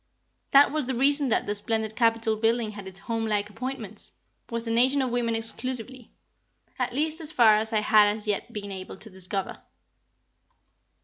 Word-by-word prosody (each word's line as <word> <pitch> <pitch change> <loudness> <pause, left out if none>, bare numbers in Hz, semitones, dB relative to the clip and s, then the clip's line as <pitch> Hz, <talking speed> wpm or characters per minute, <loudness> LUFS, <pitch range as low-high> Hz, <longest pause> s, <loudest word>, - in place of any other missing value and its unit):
That 280 +1 +6
was 305 -2 -1
the 260 0 -2
reason 280 +2 +3
that - - +1
the 205 - -1
splendid 220 +1 -2
Capitol 230 -2 +2
building 225 0 +1
had 205 -2 -9
its 190 0 -10
home 225 +3 -3
like 210 -1 -1
appointments, 230 -3 -6 0.4
was 230 -1 -2
a 230 - -2
Nation 255 +5 +4
of 255 - -2
women 235 -1 0
exclusively 245 +2 -2 0.7
at - - 0
least 310 +5 -1
as 315 -1 -6
far 220 -6 +5
as 220 +1 -2
I 215 -1 +1
had 210 -1 +5
as 215 0 -4
yet 205 -1 -2
been 205 -1 -6
able 190 0 -7
to 215 +2 -5
discover. 190 +1 -4
225 Hz, 180 wpm, -26 LUFS, 210-255 Hz, 0.7 s, That